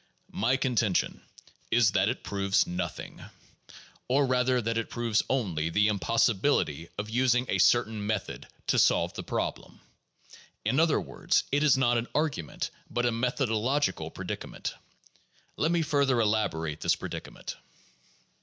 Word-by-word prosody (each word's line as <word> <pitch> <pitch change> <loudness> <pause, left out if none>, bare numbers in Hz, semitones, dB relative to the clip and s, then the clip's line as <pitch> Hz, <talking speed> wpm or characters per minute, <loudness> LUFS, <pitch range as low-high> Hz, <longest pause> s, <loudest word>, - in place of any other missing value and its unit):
My 120 +6 +2
contention 120 -8 0 0.5
is 115 -3 +4
that 100 - +2
it 125 - -4
proves 100 -1 +1
nothing; 90 +1 -5 0.8
or 135 +3 +3
rather 125 0 +2
that 115 0 -1
it 115 - -4
proves 115 -3 +1
only 90 -12 0
the 105 +5 +3
impossibility 100 - +1
of 105 +1 -4
using 125 +1 +2
a - - 0
certain 110 -3 +3
method 105 -3 -3 0.2
to - - +2
solve - - +3
the - - -5
problem. - - -4 0.9
In 125 +7 +2
other 160 -2 +3
words, - - 0
it 145 +1 +2
is 150 -3 +5
not 120 -2 +3
an 115 - -4
argument, 150 - -2 0.2
but 120 0 -1
a 120 - +3
methodological 125 +3 0
predicament. - - -5 0.8
Let 160 - +1
me 170 -1 +2
further 140 -5 +2
elaborate 100 -9 0
this - - +2
predicament. - - -7
115 Hz, 135 wpm, -28 LUFS, 105-130 Hz, 0.9 s, is